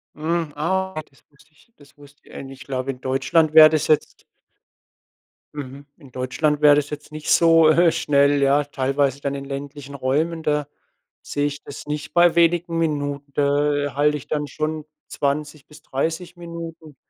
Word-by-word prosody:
Mhm, 160 Hz, 0 st, -2 dB
ah, 190 Hz, +1 st, -2 dB
das 135 Hz, -, -27 dB
wusste 145 Hz, +2 st, -25 dB
ich 235 Hz, -, -27 dB
das 145 Hz, -1 st, -21 dB
wusste 145 Hz, 0 st, -18 dB
ich, -, -, -19 dB
äh, -, -, -7 dB
nicht. 135 Hz, 0 st, -11 dB
Glaube 130 Hz, 0 st, -3 dB
in 125 Hz, -1 st, -13 dB
Deutschland 150 Hz, +5 st, +1 dB
wäre 155 Hz, -1 st, +10 dB
das 155 Hz, -1 st, 0 dB
jetzt 155 Hz, -, 0 dB, 1.3 s
Mhm, 140 Hz, 0 st, -8 dB
in 140 Hz, -6 st, -17 dB
Deutschland 145 Hz, +4 st, -1 dB
wäre 150 Hz, -1 st, +7 dB
das 145 Hz, -1 st, -1 dB
jetzt 150 Hz, 0 st, -8 dB
nicht 155 Hz, 0 st, -7 dB
so, 165 Hz, -2 st, +5 dB
äh, 170 Hz, +1 st, +4 dB
schnell, 140 Hz, -1 st, +2 dB
ja, 140 Hz, +1 st, +3 dB
teilweise 140 Hz, 0 st, -1 dB
dann 140 Hz, 0 st, -2 dB
in 140 Hz, 0 st, -6 dB
ländlichen 140 Hz, 0 st, -7 dB
Räumen, 150 Hz, +5 st, -1 dB
da 150 Hz, -2 st, -1 dB, 0.5 s
sehe 145 Hz, 0 st, -2 dB
ich 145 Hz, 0 st, -4 dB
das 140 Hz, -, -10 dB
nicht 150 Hz, 0 st, -5 dB
bei 175 Hz, -1 st, +5 dB
wenigen 170 Hz, 0 st, +2 dB
Minuten. 145 Hz, -3 st, -2 dB
Da 145 Hz, 0 st, +1 dB
halte 150 Hz, +1 st, +2 dB
ich 140 Hz, -, -12 dB
dann 150 Hz, -1 st, -2 dB
schon 155 Hz, +2 st, -4 dB, 0.2 s
20 145 Hz, 0 st, -3 dB
bis 150 Hz, 0 st, -17 dB
30 165 Hz, +6 st, -3 dB
Minuten. 165 Hz, -3 st, -9 dB
145 Hz, 170 wpm, -22 LUFS, 140-155 Hz, 1.3 s, wäre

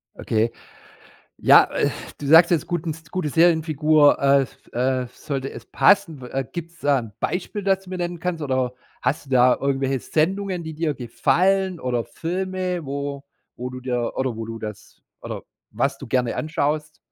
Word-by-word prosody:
Okay. 115 Hz, +1 st, 0 dB, 0.9 s
Ja, -, -, +7 dB
äh, -, -, +1 dB, 0.3 s
du 145 Hz, -, -6 dB
sagst 165 Hz, +4 st, +7 dB
jetzt, 170 Hz, -3 st, +1 dB
guten 170 Hz, -2 st, -2 dB
S 160 Hz, +1 st, -8 dB
gute 185 Hz, -5 st, -2 dB
Serienfigur, 155 Hz, -2 st, +4 dB
äh 140 Hz, 0 st, +4 dB
f 125 Hz, -, -8 dB, 0.2 s
äh 130 Hz, +1 st, +1 dB
f 125 Hz, -, -14 dB
sollte 135 Hz, -3 st, -4 dB
es -, -, -9 dB
passen. 175 Hz, -9 st, +3 dB
Wa 130 Hz, +2 st, -3 dB
gibt 170 Hz, +6 st, -7 dB
es 170 Hz, -, -22 dB
da 145 Hz, -1 st, +3 dB
ein 115 Hz, -4 st, -7 dB
Beispiel, 200 Hz, +3 st, -2 dB
das 195 Hz, 0 st, +1 dB
du 185 Hz, -, -12 dB
mir 185 Hz, -, -3 dB
nennen 175 Hz, 0 st, -3 dB
kannst 170 Hz, -2 st, -3 dB
oder 130 Hz, -2 st, 0 dB, 0.3 s
hast 135 Hz, +3 st, -1 dB
du -, -, -14 dB
da 125 Hz, -1 st, +5 dB
irgendwelche 135 Hz, -1 st, 0 dB
Sendungen, 185 Hz, +4 st, -1 dB
die 160 Hz, -1 st, -6 dB
dir 155 Hz, -1 st, -1 dB
gefallen 185 Hz, +9 st, +1 dB
oder 125 Hz, -4 st, -1 dB
Filme, 185 Hz, 0 st, -3 dB
wo 140 Hz, 0 st, -4 dB, 0.3 s
wo 125 Hz, +1 st, -5 dB
du 125 Hz, -, -7 dB
dir 125 Hz, -2 st, -2 dB
oder 130 Hz, -3 st, -1 dB
wo 115 Hz, 0 st, -5 dB
du 115 Hz, 0 st, -6 dB
das 105 Hz, -2 st, -9 dB, 0.2 s
oder -, -, -6 dB, 0.3 s
was 135 Hz, +6 st, 0 dB
du 135 Hz, -, -9 dB
gerne 125 Hz, -1 st, +1 dB
anschaust? 150 Hz, -1 st, -1 dB
145 Hz, 180 wpm, -23 LUFS, 130-170 Hz, 0.9 s, Ja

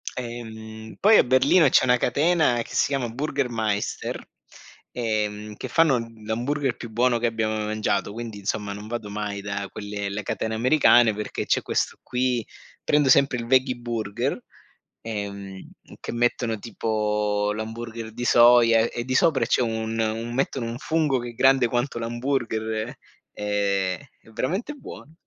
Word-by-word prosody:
Ehm, 110 Hz, -2 st, -8 dB
poi 215 Hz, +2 st, +6 dB
a -, -, +6 dB
Berlino 130 Hz, +6 st, +4 dB
c'è -, -, +5 dB
una 125 Hz, -1 st, +4 dB
catena 145 Hz, 0 st, +2 dB
che -, -, -12 dB
si -, -, +3 dB
chiama 135 Hz, -4 st, -1 dB
Burger 140 Hz, +2 st, -2 dB
Maister, 110 Hz, -3 st, -2 dB, 0.7 s
ehm, 105 Hz, -2 st, -2 dB
che -, -, -6 dB
fanno 160 Hz, -6 st, +3 dB, 0.3 s
l'hamburger 125 Hz, +4 st, -1 dB
più 115 Hz, -, -8 dB
buono 120 Hz, +2 st, +2 dB
che 120 Hz, -, +1 dB
abbia 110 Hz, -1 st, -1 dB
mai 110 Hz, 0 st, -2 dB
mangiato, 105 Hz, -2 st, -1 dB
quindi 115 Hz, -2 st, -6 dB
insomma 100 Hz, 0 st, -3 dB
non 105 Hz, +1 st, -8 dB
vado 115 Hz, -2 st, -5 dB
mai 100 Hz, -1 st, -4 dB
da 100 Hz, 0 st, -4 dB
quelle 100 Hz, -1 st, -5 dB
le 105 Hz, +1 st, -4 dB
catene 110 Hz, +3 st, -2 dB
americane 120 Hz, -2 st, +5 dB
perché 105 Hz, +1 st, -4 dB
c'è -, -, +2 dB
questo -, -, -1 dB
qui, 125 Hz, -2 st, -1 dB, 0.4 s
prendo 145 Hz, -2 st, +3 dB
sempre 135 Hz, -1 st, +4 dB
il 115 Hz, -, -4 dB
Veggie 130 Hz, +1 st, +3 dB
Burger, 115 Hz, -4 st, -3 dB, 0.6 s
ehm, 100 Hz, -3 st, -6 dB, 0.3 s
che -, -, -6 dB
mettono 120 Hz, -1 st, 0 dB
tipo 105 Hz, -2 st, -1 dB
l'hamburger 110 Hz, +1 st, -6 dB
di 120 Hz, -, -5 dB
soia 120 Hz, -1 st, +6 dB
e 115 Hz, -, +1 dB
e 120 Hz, -, -4 dB
di 130 Hz, +1 st, -2 dB
sopra 135 Hz, -5 st, +3 dB
c'è 125 Hz, -, +2 dB
un 115 Hz, -1 st, -2 dB
un 115 Hz, +1 st, -2 dB
mettono 130 Hz, -2 st, -1 dB
un 115 Hz, +1 st, -5 dB
fungo 155 Hz, -2 st, +1 dB
che 120 Hz, 0 st, -6 dB
è -, -, -11 dB
grande 135 Hz, 0 st, +4 dB
quanto 120 Hz, +1 st, -1 dB
l'hamburger. 115 Hz, -2 st, -2 dB, 0.4 s
Ehm, 100 Hz, -3 st, -1 dB, 0.2 s
è -, -, -23 dB
veramente 190 Hz, -, -2 dB
buono. 215 Hz, -, -11 dB
115 Hz, 160 wpm, -24 LUFS, 105-125 Hz, 0.7 s, poi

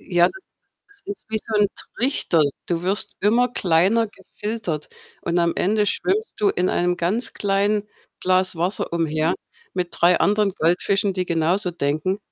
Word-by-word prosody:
Ja, 175 Hz, -2 st, +3 dB
das 380 Hz, 0 st, -12 dB
ist -, -, -45 dB, 0.3 s
das 405 Hz, 0 st, -17 dB
ist -, -, -28 dB
wie 220 Hz, -, 0 dB
so 220 Hz, +1 st, -5 dB
'n 205 Hz, -, +5 dB, 0.3 s
Trichter. 230 Hz, -, +3 dB, 0.2 s
Du 170 Hz, -1 st, -1 dB
wirst 195 Hz, +3 st, -1 dB
immer 235 Hz, +5 st, +3 dB
kleiner 195 Hz, +2 st, +2 dB
gefiltert 200 Hz, -5 st, -5 dB, 0.3 s
und 170 Hz, +1 st, 0 dB
am 170 Hz, -1 st, +2 dB
Ende 210 Hz, +2 st, +2 dB
schwimmst 425 Hz, -, -1 dB
du 210 Hz, -, +3 dB
in 180 Hz, +1 st, 0 dB
einem 175 Hz, 0 st, +1 dB
ganz 215 Hz, +8 st, -1 dB
kleinen 205 Hz, +1 st, +1 dB, 0.3 s
Glas 185 Hz, -1 st, +2 dB
Wasser 175 Hz, +3 st, -1 dB
umher 160 Hz, -1 st, +1 dB, 0.4 s
mit 180 Hz, -1 st, -1 dB
3 175 Hz, +1 st, +3 dB
anderen 205 Hz, -1 st, +2 dB
Goldfischen, 195 Hz, +4 st, +1 dB
die 185 Hz, -1 st, -2 dB
genauso 175 Hz, +3 st, +1 dB
denken. 155 Hz, +4 st, -1 dB
185 Hz, 160 wpm, -22 LUFS, 170-210 Hz, 0.4 s, n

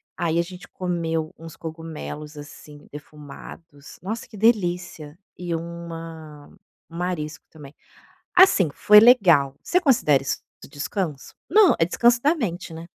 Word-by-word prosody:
Aí 170 Hz, -1 st, -1 dB
a -, -, +4 dB
gente 180 Hz, +2 st, -10 dB
comeu 165 Hz, -3 st, -3 dB
uns 165 Hz, -1 st, -12 dB
cogumelos, 160 Hz, -2 st, -8 dB
assim, 145 Hz, 0 st, -13 dB
defumados, 150 Hz, 0 st, -13 dB
nossa, 220 Hz, +5 st, -5 dB
que 210 Hz, -, -14 dB
delícia 180 Hz, -7 st, 0 dB, 0.2 s
e 175 Hz, -1 st, -4 dB
uma 165 Hz, -3 st, -8 dB, 0.4 s
um 165 Hz, -, -10 dB
marisco 155 Hz, -5 st, -4 dB
também. 150 Hz, -2 st, -14 dB, 0.6 s
Assim, 355 Hz, -, +5 dB
foi 210 Hz, +7 st, +6 dB
legal. 175 Hz, -, +5 dB
Você 360 Hz, -, +1 dB
considera 190 Hz, -, +3 dB
isso 135 Hz, -, -2 dB, 0.2 s
do -, -, -12 dB
descanso? 145 Hz, +1 st, -5 dB, 0.2 s
Não, 415 Hz, 0 st, +6 dB
é 165 Hz, -, +3 dB
descanso 235 Hz, +7 st, +2 dB
da 300 Hz, +4 st, +3 dB
mente, 185 Hz, -, -4 dB
né? 165 Hz, +1 st, -9 dB
165 Hz, 140 wpm, -23 LUFS, 150-190 Hz, 0.6 s, foi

